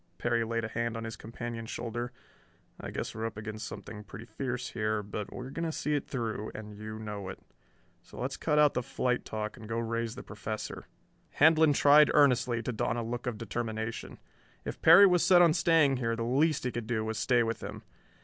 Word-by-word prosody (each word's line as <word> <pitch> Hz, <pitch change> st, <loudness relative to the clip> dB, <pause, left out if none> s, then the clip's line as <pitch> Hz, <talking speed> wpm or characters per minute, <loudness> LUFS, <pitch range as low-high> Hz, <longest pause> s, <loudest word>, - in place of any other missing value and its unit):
Perry 120 Hz, -1 st, +1 dB
laid 115 Hz, 0 st, -2 dB
a -, -, -2 dB
hand 115 Hz, +1 st, -2 dB
on 115 Hz, -, -5 dB
his 115 Hz, 0 st, -5 dB
companion's 115 Hz, 0 st, -7 dB
shoulder. 120 Hz, +1 st, -4 dB, 0.7 s
"I -, -, -6 dB
guess -, -, -4 dB
we're 110 Hz, +1 st, -3 dB
up 110 Hz, -, -8 dB
against 110 Hz, 0 st, -6 dB
something 105 Hz, -1 st, -8 dB
pretty 110 Hz, +3 st, -10 dB
fierce 125 Hz, -1 st, -4 dB
here, 110 Hz, -1 st, -1 dB
but 105 Hz, 0 st, -6 dB
we're 125 Hz, +1 st, -7 dB
going 165 Hz, -, -4 dB
to 165 Hz, -, -1 dB
see 150 Hz, -1 st, -2 dB
it 145 Hz, -, -1 dB
through, 110 Hz, -4 st, -3 dB
and 105 Hz, -1 st, -8 dB
you 110 Hz, +1 st, -7 dB
know 105 Hz, -3 st, -6 dB
it. -, -, -7 dB, 0.6 s
So -, -, -13 dB
let's 130 Hz, +2 st, -2 dB
cut 150 Hz, -2 st, 0 dB
out 150 Hz, -1 st, +5 dB
the -, -, 0 dB
flight 125 Hz, +1 st, -1 dB
talk 105 Hz, 0 st, -4 dB
and 110 Hz, -, -11 dB
go 115 Hz, -, -2 dB
raise 115 Hz, 0 st, -2 dB
the -, -, -8 dB
Professor." 110 Hz, 0 st, -6 dB, 0.5 s
Handlon 160 Hz, 0 st, +5 dB
tried 145 Hz, +1 st, +6 dB
earnestly 125 Hz, -5 st, +3 dB
to 125 Hz, -, -2 dB
don 110 Hz, 0 st, -1 dB
a 120 Hz, -, -2 dB
look 120 Hz, +2 st, -4 dB
of 120 Hz, -3 st, -2 dB
determination. 110 Hz, +1 st, -4 dB, 0.5 s
If -, -, -6 dB
Perry 170 Hz, +5 st, +9 dB
was 180 Hz, -3 st, +4 dB
set 175 Hz, -1 st, +7 dB
on 165 Hz, -2 st, +5 dB
staying 165 Hz, -5 st, +4 dB
here 115 Hz, -2 st, -1 dB
the 115 Hz, -, -3 dB
least 140 Hz, +6 st, +2 dB
he 125 Hz, -, -1 dB
could 120 Hz, -2 st, -5 dB
do 110 Hz, -2 st, -1 dB
was 110 Hz, 0 st, -3 dB
stay 125 Hz, -2 st, +3 dB
with 115 Hz, -1 st, -3 dB
him. -, -, -7 dB
115 Hz, 215 wpm, -30 LUFS, 110-130 Hz, 0.7 s, Perry